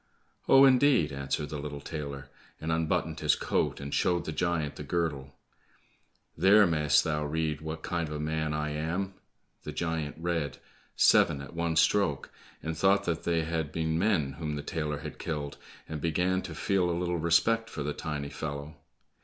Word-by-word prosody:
"Oh, 135 0 +8
indeed?" 130 - +4
answered 70 +1 -3
the 75 - -4
little 70 0 -5
tailor, 70 -2 -6 0.3
and 80 +1 -3
unbuttoned 80 -1 0
his - - +3
coat, - - -1
and 70 0 -6
showed 90 -1 +1
the - - -3
giant 80 -2 -1
the - - -8
girdle, 75 -6 -2 1.0
"There 105 +2 +6
mayst 75 -4 +3
thou 75 -3 -1
read 75 0 -1
what 80 0 -6
kind 85 -2 -2
of 75 - -5
a - - -4
man 80 0 -1
I 75 0 -2
am!" 85 +6 -2 0.5
The - - -6
giant 80 -3 -2
read, 80 -5 -2 0.4
"Seven 70 - +5
at 70 - -9
one 85 -1 -1
stroke," 80 -3 +2 0.3
and 80 0 -3
thought 95 +4 +3
that 85 -3 -2
they 85 -1 +1
had 80 -2 -2
been 80 0 -1
men 85 -9 +1
whom 75 -2 -3
the 75 - -5
tailor 75 -1 -3
had 75 0 -8
killed, 75 -4 -4 0.3
and 75 -2 -5
began 90 +3 +1
to 85 -4 -7
feel 95 0 +1
a 85 - 0
little 90 -1 -1
respect 100 +8 +2
for 75 - -5
the 75 +1 -2
tiny 75 -2 -4
fellow. 70 0 -6
80 Hz, 180 wpm, -29 LUFS, 75-85 Hz, 1.0 s, Oh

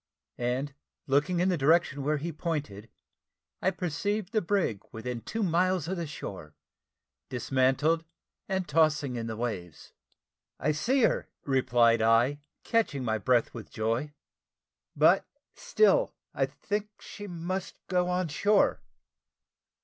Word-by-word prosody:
and 125 +4 -1 0.3
looking 150 +6 +2
in 180 +2 +3
the 180 - +1
direction 145 0 +3
where 150 +2 +1
he 165 +4 -4
pointed, 145 - -4 0.7
I - - +3
perceived 190 +3 -2
the 220 -2 +2
brig 170 - 0
within 115 +1 -5
two 220 - -3
miles 180 -1 +1
of 190 - -2
the 170 -3 -4
shore, 95 - -8 0.7
dismantled, 135 +6 +1 0.5
and 190 -1 -1
tossing 150 -4 +2
in 115 -1 -3
the 110 -1 -5
waves. 95 -9 -5 0.7
"I 155 - +1
see 245 - +1
her," - - +1
replied 120 -4 +3
I, 115 +6 +3 0.2
catching 215 - 0
my 110 -2 0
breath 120 +2 +2
with 115 -4 -8
joy; 115 +7 -1 0.8
"but - - +4 0.3
still - - +2 0.2
I - - +1
think 210 0 -4
she 205 - -9
must 180 +1 -4
go 180 -1 +1
on 180 0 0
shore." 205 +8 +2
150 Hz, 130 wpm, -29 LUFS, 120-185 Hz, 0.8 s, but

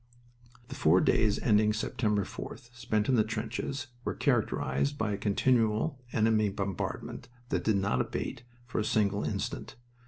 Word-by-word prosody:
"The - - -6
four 85 +4 +4
days 105 +1 +3
ending 105 -1 +3
September 110 -2 0
4th, 120 0 -9
spent 110 -3 0
in 135 - +3
the 115 -3 +5
trenches, 115 +5 -3 0.2
were - - -2
characterized 70 - +1
by 110 -4 0
a - - 0
continual 115 +5 +1
enemy 110 -1 +3
bombardment 100 +2 -4 0.2
that - - 0
did 110 -2 +3
not 95 -10 +1
abate 120 - -4 0.2
for 120 - -3
a - - +1
single 105 -1 +1
instant. - - -3
110 Hz, 150 wpm, -30 LUFS, 100-120 Hz, 0.2 s, the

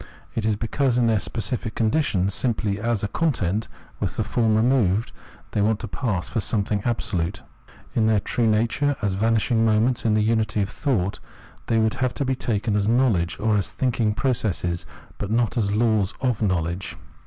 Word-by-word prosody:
It 110 -1 -1
is 110 - +2
because 120 +4 0
in 120 - +3
their 110 -2 +3
specific 110 +2 -3
condition, 110 - +1
simply 105 -3 0
as 115 -1 -1
a - - +1
content 110 - 0 0.3
with - - -3
the - - +1
form 110 -2 +1
removed, 110 -3 +2 0.4
they 105 - 0
want 110 +1 +2
to 115 - -4
pass 100 -5 -2
for 115 - -2
something 100 +1 0
absolute. 105 -7 -2 0.5
In 110 -1 +2
their 110 -2 +3
true 115 +3 0
nature, 120 +7 +1
as 100 -2 +1
vanishing 115 +3 +2
moments 115 +3 +2
in 110 -2 +2
the 105 - +3
unity 110 -2 +1
of 100 - -4
thought, 105 - -1 0.5
they 115 - +2
would 110 -1 +2
have 130 -1 -1
to 140 - -1
be 130 - +1
taken 110 -4 -1
as 105 -1 +1
knowledge 110 -9 +2
or 110 -1 +2
as 100 - -1
thinking 115 -4 0
process, 110 -8 -1 0.3
but 100 - -3
not 115 0 +1
as 105 -5 +1
laws 110 -2 +1
of 125 -5 0
knowledge. 90 -2 -1
110 Hz, 180 wpm, -24 LUFS, 100-120 Hz, 0.5 s, in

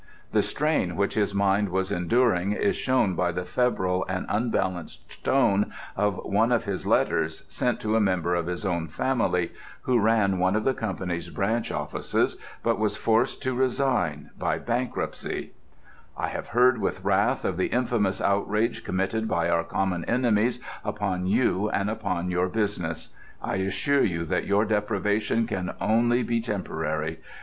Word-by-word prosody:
The - - +4
strain 150 - 0
which 100 0 0
his 100 -2 0
mind 100 0 +2
was 95 +2 -1
enduring 100 0 +2
is 200 - +1
shown 125 -7 +2
by 90 0 +1
the 90 +1 -4
febrile 95 -3 +1
and 95 -1 -2
unbalanced 95 -6 -2
tone 105 -7 +3 0.2
of 105 -1 +1
one 115 +4 +2
of 120 - +2
his 100 -2 -4
letters, - - +1
sent 125 -2 -1
to 110 0 0
a 115 - +4
member 90 -4 +1
of 85 -1 0
his 90 +3 -3
own 85 -3 -1
family 90 - 0 0.3
who 125 -2 +2
ran 105 -3 +3
one 95 +2 +2
of 110 - +1
the 135 - +2
company's 90 -6 -3
branch 110 +6 -1
offices - - -1 0.3
but - - +1
was 105 -1 0
forced 115 +5 +1
to 130 -1 0
resign 125 - 0
by - - 0
bankruptcy: 120 +1 -3 0.7
"I - - -1
have - - -5
heard 125 +2 +4
with - - -2
wrath - - +2
of - - 0
the 95 - +1
infamous 115 -6 0
outrage 105 +3 0
committed 95 +4 -1
by 85 -5 +1
our 85 - +2
common 90 -2 -1
enemies 120 0 +2 0.2
upon 95 -3 -2
you 105 -1 +2
and 100 +2 0
upon 100 -5 -2
your 90 +1 +1
business. 90 -6 -2 0.3
I - - -2
assure 95 +9 +1
you 85 -3 0
that 80 - -1
your 100 +2 +3
deprivation 105 +1 +1
can 95 -5 -3
be - - -2
only 120 +2 +2
temporary. 80 -7 -3
100 Hz, 160 wpm, -26 LUFS, 90-115 Hz, 0.7 s, The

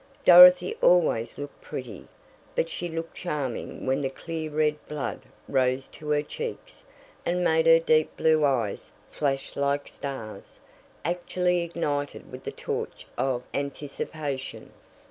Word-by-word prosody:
Dorothy 180 0 +9
always 160 -10 +3
looked 145 0 -8
pretty, 115 -8 -7 0.5
but 165 - 0
she 175 - -4
looked 165 0 -5
charming 145 -8 -4
when 135 +2 +1
the 135 - -1
clear 160 +3 -5
red 150 0 0
blood 145 -3 -4 0.3
rose 130 0 +1
to 150 - -9
her 150 0 +2
cheeks 475 - -7 0.4
and 180 +1 0
made 160 -1 +3
her 165 0 +9
deep 155 -1 +2
blue 155 -1 +3
eyes 125 -8 0 0.2
flash 135 -2 -2
like 140 0 0
stars, 115 -8 -8 0.5
actually 180 +1 0
ignited 150 -4 -3
with - - -10
the - - -3
torch - - -5
of 130 -2 -1
anticipation. 140 0 -5
150 Hz, 130 wpm, -26 LUFS, 135-165 Hz, 0.5 s, Dorothy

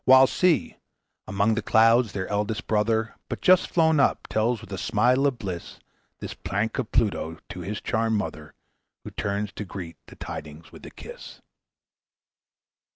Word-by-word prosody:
While 130 0 +8
see! 165 -1 +1 0.5
among 100 +3 +2
the 110 - -1
clouds, 115 +1 +4
their 95 -1 -3
eldest 105 +2 -2
brother, 110 +1 +1 0.2
But - - -4
just 185 0 +4
flown 160 -3 +3
up, 140 - +2
tells 110 +2 +1
with 95 - -10
a - - -3
smile 125 +5 +3
of 135 -3 -1
bliss, 90 -6 -6 0.4
This - - -5
prank 105 +6 -2
of 125 - -3
Pluto 85 -7 0
to 90 - -7
his 100 +4 -5
charmed 110 0 0
mother, 75 -7 -5 0.5
Who - - -8
turns 100 +1 -2
to 105 - -6
greet 90 -4 -8
the - - -13
tidings 75 +1 -8
with - - -14
a - - -8
kiss." - - -11
110 Hz, 160 wpm, -25 LUFS, 100-120 Hz, 0.5 s, While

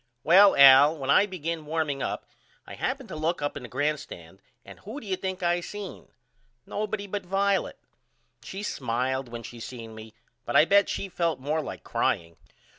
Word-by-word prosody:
Well 195 +5 +7
Al 140 +3 +8
when 135 -2 -1
I 205 - +5
begin 165 -4 -5
warming 150 -3 -2
up - - -3 0.4
I - - -10
happened - - -3
to - - -6
look 160 +3 -1
up 145 0 -3
in 145 - -6
the 125 - -9
grand 145 +3 0
stand 95 - -12 0.2
and - - -13
who 220 +8 -8
do - - -13
you 195 -2 -1
think 185 0 -5
I 175 0 +1
seen? 205 +1 -8 0.6
Nobody 210 -1 -3
but 200 0 -4
Violet. 195 +1 0 0.6
She 195 +2 -7
smiled 130 - -2
when 120 0 -7
she 120 - -10
seen 115 -1 -8
me 110 0 -12 0.3
but - - -4
I - - +7
bet 200 +3 +4
she 195 - -3
felt 170 -4 -1
more 150 +4 -1
like - - -8
crying. 85 0 -1
155 Hz, 190 wpm, -26 LUFS, 130-190 Hz, 0.6 s, Al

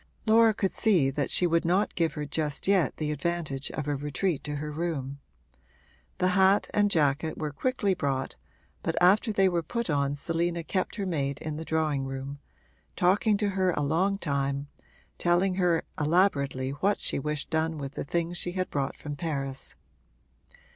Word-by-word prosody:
Laura 225 0 +6
could 200 -3 -1
see 175 -12 +3
that 140 0 -1
she 180 - +3
would 170 -1 +2
not 185 +5 +1
give 165 -2 0
her 150 -1 -4
just 150 +1 -2
yet 195 -4 +2
the 150 -1 -1
advantage 150 -3 -2
of 150 -1 -4
a 145 - 0
retreat 150 +4 -2
to 145 0 -4
her 150 +1 -4
room. 145 -4 -3 1.0
The 185 0 +2
hat 190 +2 +3
and 205 0 +3
jacket 155 -2 +1
were 150 -1 -3
quickly 220 - 0
brought, 140 -6 -2 0.5
but - - -2
after 200 +6 +4
they 195 -2 +3
were 175 -2 +1
put 235 +3 -3
on 140 -1 +1
Selina 170 +3 -1
kept 185 +3 -2
her 200 - -3
maid 140 -6 -1
in 155 -1 -4
the 160 - -5
drawing 155 -4 0
room, 135 +1 -6 0.6
talking 205 +4 +3
to 205 -1 0
her 190 -1 +1
a 145 - -1
long 180 +7 +1
time, 140 -3 -2 0.5
telling 175 +2 +2
her 175 -3 +2 0.2
elaborately 145 -5 +2
what 190 +9 0
she - - 0
wished 150 +1 -3
done 160 0 0
with 140 -1 -6
the - - -4
things 170 +3 -2
she 175 - -3
had 185 0 -2
brought 140 -1 -2
from 145 -1 -6
Paris. 140 -4 -4
160 Hz, 175 wpm, -28 LUFS, 145-185 Hz, 1.0 s, Laura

